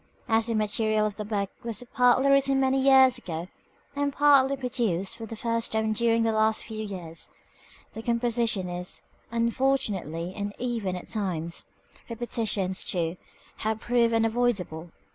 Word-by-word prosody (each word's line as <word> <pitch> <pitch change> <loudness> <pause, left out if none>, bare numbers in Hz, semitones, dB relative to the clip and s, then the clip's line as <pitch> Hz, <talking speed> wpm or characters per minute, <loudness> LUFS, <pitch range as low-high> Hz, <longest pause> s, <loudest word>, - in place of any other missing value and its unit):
As 225 0 +2
the 230 - 0
material 215 0 +1
of 210 -2 -3
the 210 - -3
book 200 -2 -2
was 230 0 -3
partly 250 +1 +4
written 275 0 +4
many 265 0 +2
years 265 -2 +6
ago, 170 -4 -6 0.5
and 285 0 0
partly 275 -1 +4
produced 235 -8 -1
for 225 -1 -8
the 225 - -6
first 230 0 -1
time 220 0 +1
during 230 +1 +2
the 225 - +2
last 220 0 +2
few 220 -1 -5
years, 175 -6 -6 0.6
the 225 - -6
composition 235 -4 +1
is, 180 0 -4 0.3
unfortunately, 225 - -1
uneven 205 -1 -3
at 180 - -7
times; 170 -6 -4 0.4
repetitions, 220 -5 -1
too, 170 -2 -2 0.4
have 220 0 -2
proved 235 -1 +2
unavoidable. 225 -8 0
225 Hz, 145 wpm, -27 LUFS, 200-240 Hz, 0.6 s, years